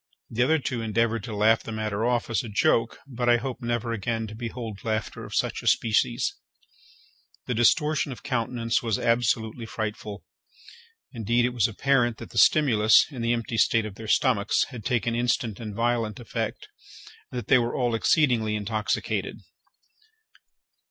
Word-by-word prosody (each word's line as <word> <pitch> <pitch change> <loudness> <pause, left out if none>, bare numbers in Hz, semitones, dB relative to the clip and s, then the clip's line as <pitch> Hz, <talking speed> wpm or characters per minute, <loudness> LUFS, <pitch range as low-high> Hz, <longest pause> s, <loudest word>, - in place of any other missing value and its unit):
The 115 - -1
other 155 +6 +4
two 130 -5 -3
endeavoured 115 0 0
to 110 - -6
laugh 110 +2 +4
the - - -8
matter 110 -1 -2
off 120 -1 0
as 115 - +1
a 115 - -7
joke, 115 +2 +1
but 125 -3 -2
I 120 - +6
hope 125 +1 -5
never 120 -1 -2
again 115 +1 -2
to 110 - -8
behold 115 -2 -6
laughter 110 -1 -3
of - - -7
such - - -1
a - - -7
species: 115 +1 +2 1.1
the 125 - -2
distortion 140 +4 +2
of 125 - -9
countenance 115 -3 -1
was 115 -4 0
absolutely 115 -1 0
frightful. 105 -2 -5 0.9
Indeed, 120 +1 +1
it 125 - -1
was 120 -5 +2
apparent 120 +1 +1
that - - -10
the - - 0
stimulus, 110 -8 +5
in 130 -4 -6
the 115 0 +1
empty 115 -1 -2
state 115 -2 +3
of 105 - -6
their 110 +2 -9
stomachs, 110 -3 +2
had 120 -6 -9
taken 120 -2 0
instant 120 -2 -1
and 105 -3 -6
violent 115 -2 -1
effect, 115 -4 -4 0.6
and 125 - -5
that 120 - -5
they 130 - +5
were 120 0 -1
all 120 -2 0
exceedingly 115 -3 +2
intoxicated. 105 +1 -2
115 Hz, 165 wpm, -26 LUFS, 110-120 Hz, 1.1 s, I